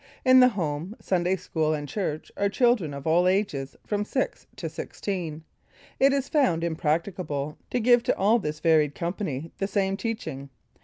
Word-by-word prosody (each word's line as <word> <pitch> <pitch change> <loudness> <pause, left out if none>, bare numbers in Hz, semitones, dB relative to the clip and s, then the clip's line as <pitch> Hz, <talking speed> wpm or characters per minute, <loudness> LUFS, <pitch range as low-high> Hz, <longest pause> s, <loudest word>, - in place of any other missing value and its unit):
In 255 0 +8
the 250 - +8
Home, 175 -3 -3
Sunday 180 0 +1
School 155 -4 -1
and 145 -1 -5
Church 155 -2 -3
are 200 0 +1
children 235 - +2
of 140 -1 -7
all 170 +3 +4
ages, 185 -9 0
from 205 -1 -1
six 260 +5 -2
to - - -5
sixteen. 165 -6 -5 0.6
It 275 +1 +5
is 275 -1 0
found 255 - +2
impracticable 160 -2 -2
to 250 - 0
give 245 +1 +5
to - - +1
all 215 +5 +4
this 155 -5 -4
varied 155 -3 +3
company 170 -4 -3
the 195 - 0
same 195 -1 0
teaching. 195 - -4
180 Hz, 165 wpm, -26 LUFS, 155-210 Hz, 0.6 s, In